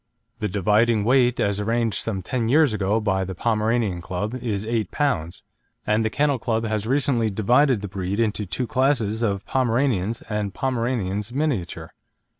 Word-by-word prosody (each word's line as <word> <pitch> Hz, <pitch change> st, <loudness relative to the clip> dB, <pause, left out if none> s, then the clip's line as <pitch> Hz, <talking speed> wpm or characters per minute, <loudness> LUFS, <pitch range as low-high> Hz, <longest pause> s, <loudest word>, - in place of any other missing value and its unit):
The 105 Hz, -, -1 dB
dividing 105 Hz, +3 st, +2 dB
weight, 125 Hz, +1 st, +3 dB
as 100 Hz, 0 st, +1 dB
arranged 115 Hz, +1 st, 0 dB
some 95 Hz, -5 st, -3 dB
ten 115 Hz, +2 st, -1 dB
years 150 Hz, -2 st, +4 dB
ago 105 Hz, +1 st, +1 dB
by 95 Hz, -3 st, 0 dB
the 95 Hz, 0 st, -5 dB
Pomeranian 110 Hz, -3 st, 0 dB
Club, 95 Hz, +6 st, -4 dB
is 115 Hz, -5 st, -3 dB
8 110 Hz, -4 st, -1 dB
lb., 90 Hz, -, -1 dB, 0.4 s
and 105 Hz, +1 st, +2 dB
the 110 Hz, -, +1 dB
Kennel 145 Hz, +2 st, +1 dB
Club 115 Hz, -2 st, -1 dB
has 110 Hz, -1 st, -2 dB
recently 130 Hz, -4 st, +1 dB
divided 120 Hz, +4 st, +3 dB
the 100 Hz, -, -4 dB
breed 95 Hz, +1 st, -3 dB
into 105 Hz, -2 st, 0 dB
two 100 Hz, +8 st, -2 dB
classes 120 Hz, -4 st, +1 dB
of 100 Hz, -4 st, -1 dB
Pomeranians 120 Hz, -4 st, 0 dB
and 105 Hz, -3 st, -3 dB
Pomeranians 115 Hz, -5 st, -1 dB
Miniature. 130 Hz, -, -2 dB
110 Hz, 160 wpm, -23 LUFS, 100-125 Hz, 0.4 s, years